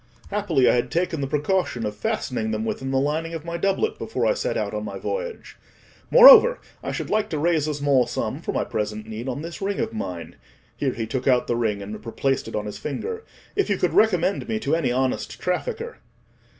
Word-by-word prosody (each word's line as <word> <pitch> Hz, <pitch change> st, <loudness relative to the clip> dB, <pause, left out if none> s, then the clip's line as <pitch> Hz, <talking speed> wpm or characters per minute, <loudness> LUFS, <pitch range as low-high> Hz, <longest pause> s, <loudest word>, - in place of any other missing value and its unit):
Happily, 185 Hz, -11 st, +2 dB
I -, -, +5 dB
had 120 Hz, 0 st, 0 dB
taken 170 Hz, -1 st, -1 dB
the 135 Hz, -, -1 dB
precaution 145 Hz, -, 0 dB
of 105 Hz, 0 st, -3 dB
fastening 110 Hz, +1 st, -2 dB
them 110 Hz, 0 st, -2 dB
within 135 Hz, +3 st, -3 dB
the 135 Hz, -, +1 dB
lining 160 Hz, +4 st, -1 dB
of 160 Hz, -1 st, -7 dB
my 170 Hz, 0 st, -4 dB
doublet 195 Hz, -, 0 dB
before -, -, -2 dB
I -, -, +4 dB
set -, -, -2 dB
out -, -, -2 dB
on -, -, -3 dB
my -, -, -5 dB
voyage. -, -, -5 dB, 0.5 s
Moreover, -, -, +9 dB, 0.2 s
I -, -, -4 dB
should -, -, -4 dB
like 215 Hz, 0 st, +1 dB
to 155 Hz, -, -2 dB
raise 155 Hz, -1 st, +1 dB
a 150 Hz, -, -1 dB
small 140 Hz, -4 st, +2 dB
sum -, -, -3 dB
for -, -, -3 dB
my -, -, 0 dB
present 105 Hz, 0 st, -3 dB
need 110 Hz, +4 st, -5 dB
on 130 Hz, +4 st, -4 dB
this 170 Hz, +5 st, -7 dB
ring 195 Hz, 0 st, -1 dB
of 225 Hz, -1 st, -2 dB
mine," 90 Hz, -, -6 dB, 0.4 s
(here 135 Hz, -3 st, -1 dB
he 115 Hz, -, -3 dB
took 130 Hz, +4 st, -3 dB
out 125 Hz, -2 st, +4 dB
the 120 Hz, -, -1 dB
ring 105 Hz, -4 st, -1 dB
and 105 Hz, +2 st, -8 dB
replaced 135 Hz, +3 st, -1 dB
it 115 Hz, -, -6 dB
on 105 Hz, -, -2 dB
his 105 Hz, -, -6 dB
finger), 450 Hz, -, -4 dB, 0.3 s
"if 400 Hz, -, +1 dB
you 200 Hz, -, +2 dB
could 180 Hz, -, 0 dB
recommend 200 Hz, -2 st, +2 dB
me 220 Hz, -, 0 dB
to 150 Hz, +3 st, +1 dB
any 145 Hz, -7 st, 0 dB
honest 130 Hz, +1 st, -1 dB
trafficker." 460 Hz, -, -3 dB
150 Hz, 220 wpm, -24 LUFS, 120-200 Hz, 0.5 s, Moreover